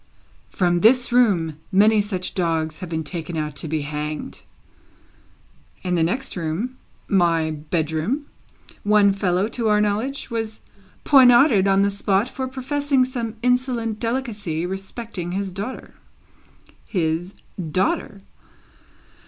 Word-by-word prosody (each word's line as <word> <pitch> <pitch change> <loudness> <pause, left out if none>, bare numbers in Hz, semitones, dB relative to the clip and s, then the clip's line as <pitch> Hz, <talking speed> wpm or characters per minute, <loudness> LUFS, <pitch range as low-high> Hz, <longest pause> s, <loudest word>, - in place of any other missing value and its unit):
From 175 -2 +1
this 245 +6 +4
room, 180 -11 +2
many 210 +2 +5
such 190 -3 -3
dogs 160 -4 -1
have 180 - -6
been 160 -1 -2
taken 165 +1 -5
out 150 -2 -3
to 155 - -2
be 155 0 -1
hanged; 150 +1 -5 1.4
in 180 - -1
the 170 - +2
next 185 +12 -1
room 180 +10 -3 0.3
(my 165 -4 +2
bedroom), 160 - -2 0.6
one 205 -1 +4
fellow, 190 0 +1
to 230 0 -2
our 210 0 +4
knowledge, 220 +7 -1
was 225 -1 -4 0.4
poniarded 245 -6 +6
on 195 0 +4
the 200 - +2
spot 200 +2 +1
for 260 0 -4
professing 270 +1 0
some 235 -4 -4
insolent 245 -3 0
delicacy 215 -9 -2
respecting 190 -1 -5
his 195 0 -2
daughter 200 +8 -6 0.9
his 175 0 -1 0.3
daughter? 200 - -1
200 Hz, 120 wpm, -22 LUFS, 170-240 Hz, 1.4 s, poniarded